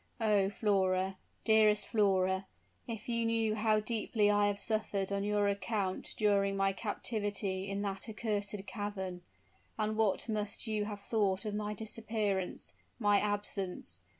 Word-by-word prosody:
Oh, 210 -3 +3
Flora 190 -2 +1 0.3
dearest 215 -2 +5
Flora, 190 -3 +2 0.4
if 225 -3 -6
you 235 -1 +1
knew 225 -1 +2
how 215 0 +3
deeply 215 -1 +1
I 205 0 +4
have 205 0 0
suffered 205 -2 -1
on 200 0 0
your 205 0 +2
account 200 -1 -2
during 200 -2 +2
my 195 0 +2
captivity 205 -2 -2
in 200 +1 -2
that 195 +2 -4
accursed 210 -2 -2
cavern! 195 -3 -4 0.6
And 215 0 0
what 220 -1 +1
must 210 -2 -2
you 215 -2 0
have 205 -1 -6
thought 200 -2 +1
of 210 - -2
my 210 0 -2
disappearance 215 -4 -2 0.2
my 205 -3 +4
absence! 195 - -3
205 Hz, 140 wpm, -33 LUFS, 195-215 Hz, 0.6 s, dearest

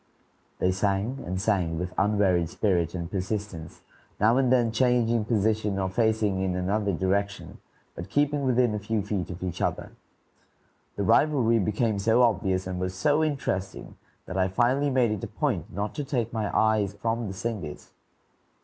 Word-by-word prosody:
They 90 - +1
sang 100 +7 -1
and 95 +1 -2
sang 95 -6 0
with 90 +2 -4
unwearied 95 -4 +2
spirit 85 -3 0
and 85 0 -5
persistence, 95 -4 -4 0.4
now 110 +3 +4
and 130 -2 +2
then 120 -3 +3
changing 120 -2 +2
position 110 -2 0
or 95 -1 -1
facing 110 -2 +1
in 95 -1 -1
another 100 +3 0
direction, 100 +3 -2 0.3
but 85 - -8
keeping 145 0 +1
within 125 -3 +2
a 105 - -2
few 105 0 -2
feet 100 -3 -3
of 90 0 -7
each 90 -1 -4
other. - - -2 1.0
The 100 - -2
rivalry 120 0 +3
became 105 +1 0
so 115 +5 +3
obvious 95 -4 +1
and 90 -1 -4
was 95 0 -3
so 145 +11 +2
interesting 130 -11 -3 0.3
that 95 - -5
I 95 - +3
finally 125 +8 +1
made 125 -4 +2
it 105 -3 -3
a - - -2
point - - -2
not 100 +3 -3
to 145 - -3
take 120 -5 -2
my 110 -2 -1
eyes 110 -2 +2
from 115 +2 -2
the 95 - -5
singers. 95 -6 -5
105 Hz, 165 wpm, -26 LUFS, 95-115 Hz, 1.0 s, now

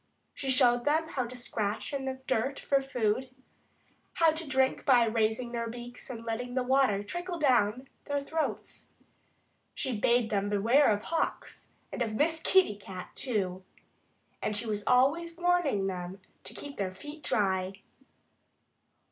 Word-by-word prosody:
She 270 - -4
showed 245 -2 +5
them 315 +3 +1
how 255 -6 -2
to 250 +1 -9
scratch 215 -1 -3
in 275 -1 -2
the 265 0 -4
dirt 260 +3 0
for 275 -1 +2
food, 255 -1 -1 0.8
how 330 -1 +4
to 315 -1 -5
drink 265 0 +2
by 250 -3 +5
raising 225 +2 0
their 230 -1 -3
heads 245 +2 -9
and 230 -2 -7
letting 245 +2 -3
the 255 - +1
water 255 -6 +2
trickle 350 - -5
down 255 -4 +2 0.2
their 285 0 -1
throats. 310 +3 -4 0.9
She 260 -4 -2
bade 235 +2 +2
them 200 -1 0
beware 230 +8 +4
of 205 0 -1
hawks 330 - -3 0.2
and - - -5
of 220 -2 -1
Miss 320 +5 +1
Kitty 375 - +4
Cat, 190 -2 -9
too. 190 -7 -2 0.8
And 210 - -1
she 215 +3 0
was 210 -2 -2
always 330 +7 +3
warning 350 - +2
them 185 0 -4 0.3
to - - -6
keep 285 -1 -8
their 185 -2 -3
feet 295 +8 -9
dry. 190 -5 0
245 Hz, 155 wpm, -30 LUFS, 210-280 Hz, 0.9 s, showed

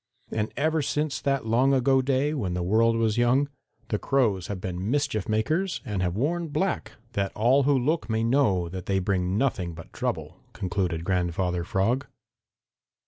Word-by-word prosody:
"And 110 0 -1
ever 155 +2 +1
since 150 +1 -1
that 135 -3 0
long 125 +5 +3
ago 135 +1 +3
day, 135 +3 +1
when 100 -12 -2
the 90 - -1
world 115 +5 +3
was 115 0 +1
young, 125 +4 +3 0.4
the 105 - 0
Crows 110 -10 +1
have 100 -2 -4
been 90 +2 -4
mischief 140 -7 0
makers 155 - 0
and 105 -6 -2
have 90 -1 0
worn 165 +9 0
black, 185 +5 -1 0.2
that 100 -2 -1
all 125 +6 +4
who 140 - +4
look 150 +3 0
may 110 0 +1
know 110 -8 +2
that 90 +1 -7
they 95 - +1
bring 95 0 0
nothing 95 -10 0
but 85 - -12
trouble," - - -3 0.2
concluded 90 -3 -2
Grandfather 90 -1 0
Frog. 115 +10 0
110 Hz, 170 wpm, -26 LUFS, 95-135 Hz, 0.4 s, all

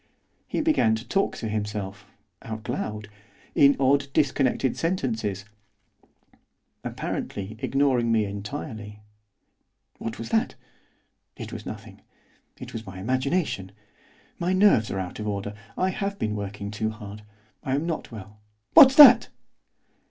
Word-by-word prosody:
He - - -1
began 300 - +3
to 110 +2 -8
talk 195 0 0
to 115 - -4
himself, 105 -2 -4 0.3
out 110 0 -7
loud, 105 -1 -4 0.5
in 140 0 +5
odd 140 +1 +3
disconnected 135 -3 +1
sentences, 110 - -2 1.4
apparently 100 +2 -5
ignoring 130 -4 +1
me 110 -2 +2
entirely. 105 0 -7 1.0
'What 115 0 -5
was 115 0 -6
that? 110 - 0 0.8
It - - -7
was - - -7
nothing. - - -9 0.6
It - - -9
was 110 -2 -7
my 95 -1 -8
imagination. 130 - -1 0.7
My 175 +2 0
nerves 185 - +4
are 95 - -3
out 95 +1 -5
of 105 - -4
order. 100 0 -3 0.2
I 185 +1 +1
have 200 +1 -3
been 105 - -2
working 100 0 -5
too 110 +1 -2
hard. 105 -1 -9 0.4
I 130 - 0
am 145 +4 -1
not 165 -6 -4
well. 105 -1 -11 0.4
_What's 275 -4 +10
that? 255 -6 +9
110 Hz, 130 wpm, -25 LUFS, 105-145 Hz, 1.4 s, What's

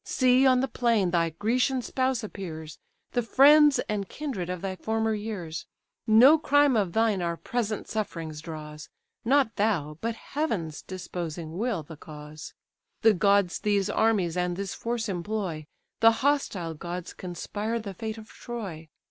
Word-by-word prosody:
See 255 +1 +4
on 255 -1 +4
the 265 - 0
plain 230 -7 +1
thy 170 -1 +2
Grecian 245 - 0
spouse 260 -2 -1
appears, 160 -7 -7 0.3
The 245 - +1
friends 290 +4 +6
and 205 -2 -3
kindred 250 - -4
of 180 -1 -4
thy 190 -1 -2
former 220 +2 -1
years. 205 -7 -5 0.4
No 250 +9 +7
crime 290 -2 +4
of 195 -6 +1
thine 220 -4 +2
our 170 -1 -2
present 220 -1 -3
sufferings 165 -8 -4
draws, 155 -1 -8 0.3
Not 260 -3 +2
thou, 165 -8 0
but 230 0 -2
Heaven's 225 - -3
disposing 170 -3 -6
will, 215 -4 -1
the 155 +1 -11
cause 150 0 -10 0.5
The 225 - +7
gods 200 -1 +2
these 200 -2 +1
armies 205 -7 +2
and 180 -1 -1
this 195 -1 -3
force 235 -1 -3
employ, 180 -4 -3 0.3
The 225 0 +7
hostile 205 - 0
gods 175 +3 -6
conspire 205 +5 -4
the 205 -3 -6
fate 220 +4 -5
of 220 -1 -11
Troy. 195 -12 -7
205 Hz, 150 wpm, -27 LUFS, 170-230 Hz, 0.5 s, No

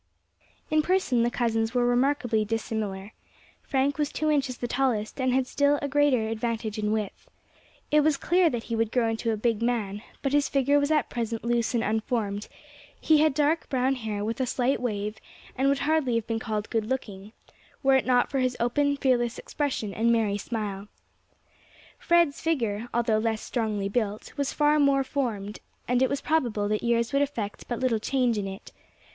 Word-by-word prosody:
In 310 0 +4
person 310 -8 +1
the 235 - +2
cousins 225 -1 -1
were 245 -1 +3
remarkably 245 -2 +2
dissimilar. 215 -2 -3 0.5
Frank 275 +1 0
was 295 -1 0
two 310 0 0
inches 270 -4 0
the 240 - -3
tallest, 250 -2 -1
and 255 0 +2
had 260 +1 +2
a - - -17
still 285 +1 +2
greater 280 -5 +2
advantage 225 -1 -3
in 210 0 0
width. 215 -2 -3 0.6
It 300 - +5
was 300 -1 +2
clear 350 +3 +3
that 240 -5 -3
he 230 - -3
would 225 -1 0
grow 235 -3 +2
into 225 +1 -2
a 220 - -1
big 225 0 0
man, 215 -4 -1 0.2
but 275 -1 0
his 290 -1 +2
figure 280 +1 +3
was 285 0 0
at 310 -1 +1
present 230 -1 -3
loose 235 0 0
and 230 - +1
unformed; 215 -2 -1 0.5
he 310 -1 +4
had 310 -3 +3
dark 305 +2 +1
brown 260 0 +1
hair, 215 -5 -3
with 230 +4 -2
a 255 - 0
slight 255 +2 0
wave, 210 -3 -2 0.4
and 270 +2 +2
would 280 - +2
hardly 300 -6 +1
have 230 -2 0
been 225 0 -2
called 215 -1 -4
good 225 -2 0
looking, 210 -6 -4 0.5
were 270 0 +5
it 265 - +1
not 245 -1 +3
for 275 - 0
his 255 -1 0
open, 285 +4 +1
fearless 245 -3 +1
expression 260 -8 -3
and 230 +3 +2
merry 220 -3 +2
smile. 205 -3 -4 1.1
Fred's 340 -4 +2
figure, 235 -8 -1
although 230 -2 +1
less 220 -1 -1
strongly 215 -4 -2
built, 210 0 -3
was 280 -1 -1
far 300 0 +3
more 280 -1 +4
formed, 225 -7 -3 0.3
and 250 +1 +2
it 260 - +3
was 280 - -2
probable 240 -10 0
that 210 0 0
years 235 +1 +1
would 280 - +3
effect 230 -8 -3
but 240 - -3
little 250 -4 +1
change 245 -1 +1
in 195 - -3
it. 195 +3 -9
240 Hz, 190 wpm, -26 LUFS, 220-275 Hz, 1.1 s, It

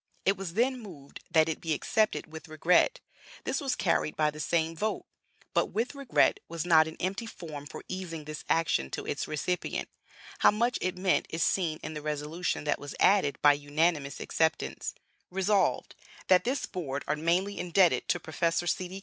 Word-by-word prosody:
It 195 - +4
was 185 -3 -6
then 255 +3 +2
moved 155 -10 -11
that 160 -1 +4
it 160 - -3
be 165 -2 0
accepted 215 +7 +1
'with 160 +1 -10
regret:' 165 - +3 0.4
this 270 - -1
was 270 -3 0
carried 165 -3 +1
by 150 -1 +2
the 155 - -10
same 165 +1 0
vote! 215 +6 -2 0.5
But - - +2
'with 230 +5 -2
regret' 275 -3 +2
was 170 0 -3
not 160 -2 +6
an 160 - -8
empty 195 +6 -2
form 150 -8 -8
for - - -9
easing 175 -4 -5
this 155 +1 -7
action 165 - +2
to - - -6
its - - -3
recipient; 165 +4 -2 0.5
how - - +7
much 235 +4 +1
it 185 0 -1
meant 185 0 +1
is 165 - -1
seen 165 -5 +1
in 155 - -5
the 150 - -5
resolution 150 +3 -2
that 150 - 0
was 145 -1 -7
added 190 -9 +4
by 145 0 +8
unanimous 145 0 0
acceptance: 160 -1 -1 0.3
"Resolved, 195 +2 +1 0.4
That 185 -1 +5
this 260 +4 0
Board 145 -6 -4
are - - +1
mainly 175 +6 0
indebted 180 0 +3
to 175 - +1
Professor 165 +2 -1
C. 185 +2 -2
170 Hz, 180 wpm, -29 LUFS, 155-190 Hz, 0.5 s, by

